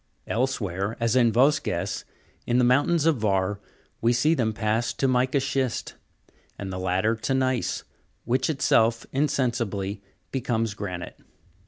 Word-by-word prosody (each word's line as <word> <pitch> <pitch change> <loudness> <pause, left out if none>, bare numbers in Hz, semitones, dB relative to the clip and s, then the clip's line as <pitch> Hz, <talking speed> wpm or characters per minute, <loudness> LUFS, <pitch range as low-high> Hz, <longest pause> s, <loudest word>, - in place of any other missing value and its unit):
Elsewhere, 110 -5 -1
as 115 +1 +1
in 120 -3 +5
Vosges, 130 - +1 0.4
in 120 - +2
the 125 - +4
mountains 145 +6 +3
of 165 -4 +3
Var, 100 -2 0 0.4
we 115 - +3
see 150 +7 +3
them 115 -8 +1
pass 110 +1 0
to 135 - 0
mica 130 +2 +2
schist; 135 -2 -2 0.6
and 95 -1 -5
the 90 - -4
latter 95 +5 +1
to 115 +4 -1
gneiss, 130 -2 0 0.4
which, 130 +3 +1
itself, 115 -5 +2
insensibly 115 -8 -1 0.3
becomes 115 -4 -1
granite. 90 -4 -6
115 Hz, 135 wpm, -25 LUFS, 105-130 Hz, 0.6 s, in